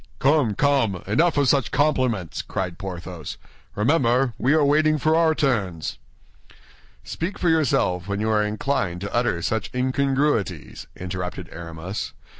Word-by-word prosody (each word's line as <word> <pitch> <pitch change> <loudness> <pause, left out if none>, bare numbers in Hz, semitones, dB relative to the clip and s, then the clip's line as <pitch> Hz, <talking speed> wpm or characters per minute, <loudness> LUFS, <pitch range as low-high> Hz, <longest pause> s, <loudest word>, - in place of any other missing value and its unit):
"Come, 135 -6 +2
come, 135 -10 +1
enough 155 - +2
of 140 -2 +3
such 130 -4 +2
compliments!" 130 - 0
cried 90 -3 -4
Porthos. 90 -4 -6 0.4
"Remember, 125 +1 +2
we 135 +5 +3
are 155 -2 +4
waiting 155 +2 +3
for 155 +3 +2
our 165 -1 +3
turns." 100 - -1 1.0
"Speak 175 +5 -4
for 175 - +1
yourself 110 - +1
when 100 0 -2
you 110 +1 0
are 105 -1 +3
inclined 105 -4 -1
to 100 - -5
utter 115 -8 0
such 110 +2 -1
incongruities," 130 - 0
interrupted 90 -1 -5
Aramis. 85 +3 -6
115 Hz, 135 wpm, -23 LUFS, 95-145 Hz, 1.0 s, are